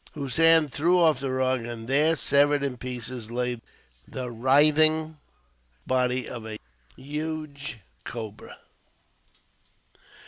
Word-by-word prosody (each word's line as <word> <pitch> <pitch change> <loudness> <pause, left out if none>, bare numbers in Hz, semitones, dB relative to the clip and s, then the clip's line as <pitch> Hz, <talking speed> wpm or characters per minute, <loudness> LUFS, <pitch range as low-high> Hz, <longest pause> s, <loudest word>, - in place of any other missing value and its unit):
Hossein 160 +3 +4
threw 170 +6 +2
off 160 -5 +4
the 135 -1 -3
rug, 130 -1 0
and 115 -1 -7
there, 150 +5 +3
severed 145 +2 +3
in 135 -3 -2
pieces, 125 -2 -6
lay 125 0 -2 0.5
the 125 -2 -6
writhing 155 +5 +3 0.7
body 125 0 0
of 120 -2 -7
a 110 -1 -6 0.4
huge 150 -1 -5 0.3
cobra. 110 -2 -8
135 Hz, 105 wpm, -26 LUFS, 125-155 Hz, 0.7 s, Hossein